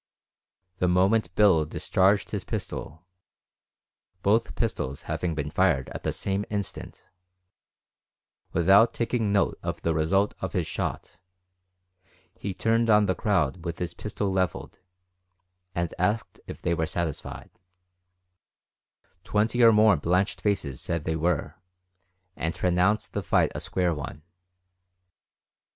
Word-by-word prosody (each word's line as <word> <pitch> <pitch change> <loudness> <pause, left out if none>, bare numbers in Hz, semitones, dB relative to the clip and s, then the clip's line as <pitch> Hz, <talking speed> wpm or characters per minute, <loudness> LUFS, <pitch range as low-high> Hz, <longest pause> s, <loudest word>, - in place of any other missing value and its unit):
The 90 - +2
moment 90 +1 +2
Bill 95 -7 +5
discharged 95 +5 +1
his - - -3
pistol 80 +4 -6 1.2
both 110 +3 +2
pistols 75 - -2
having 80 +1 -2
been 75 -1 -3
fired 65 -2 +2
at - - -7
the - - -1
same 100 +1 -2
instant 100 -2 -5 1.4
without 100 +7 +5
taking 115 -3 0
note 100 -1 +1
of - - -5
the 85 - +1
result 95 +6 +1
of - - -4
his - - 0
shot, - - -4 1.2
he 100 - -5
turned 115 +4 +1
on 105 -1 +5
the 95 - +1
crowd 90 - 0
with 85 0 -4
his 90 -1 -4
pistol 105 -2 -3
leveled, 95 -3 -2 1.0
and 85 -1 -1
asked 105 +5 -1
if - - -9
they 85 - +1
were 80 -1 -1
satisfied; 80 -1 -5 1.7
twenty 110 +4 +1
or 115 -1 +8
more 105 -3 +5
blanched 90 +3 0
faces 80 -11 -1
said 85 -3 -2
they 80 - -1
were, 80 +1 -1 0.8
and 80 0 -2
pronounced 90 +4 +1
the - - -1
fight - - +2
a - - -4
square 90 -2 0
one. 75 +1 -7
90 Hz, 125 wpm, -26 LUFS, 80-105 Hz, 1.7 s, or